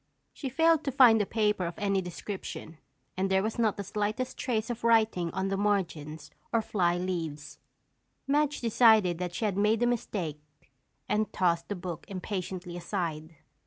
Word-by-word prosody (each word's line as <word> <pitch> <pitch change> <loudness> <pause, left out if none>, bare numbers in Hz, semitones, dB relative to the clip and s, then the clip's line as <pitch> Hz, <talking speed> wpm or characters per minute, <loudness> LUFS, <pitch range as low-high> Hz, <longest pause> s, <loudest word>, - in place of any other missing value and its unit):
She 270 - -5
failed 325 +3 +3
to 275 - 0
find 245 -5 +6
a 200 - -1
paper 210 -5 +1
of 170 - -7
any 200 -2 +1
description 180 -3 -7 0.4
and 190 +1 0
there 190 0 +2
was 220 +2 -3
not 220 -3 +2
the 200 - -3
slightest 210 +5 -2
trace 230 -2 -1
of 235 -1 -6
writing 220 -7 +3
on 190 +3 -2
the 195 - -1
margins 165 -7 -2 0.2
or 230 -1 +2
fly 175 -5 +1
leaves. 165 -5 -4 0.7
Madge 295 +1 +1
decided 220 -7 +4
that 180 -1 -4
she 220 - -1
had 200 -3 -1
made 215 +3 +2
a - - +4
mistake 190 -10 -2 0.7
and 215 0 0
tossed 170 -2 +1
the 205 - -2
book 175 -3 -6
impatiently 185 -2 -5
aside. 165 -3 -4
195 Hz, 165 wpm, -29 LUFS, 175-225 Hz, 0.7 s, find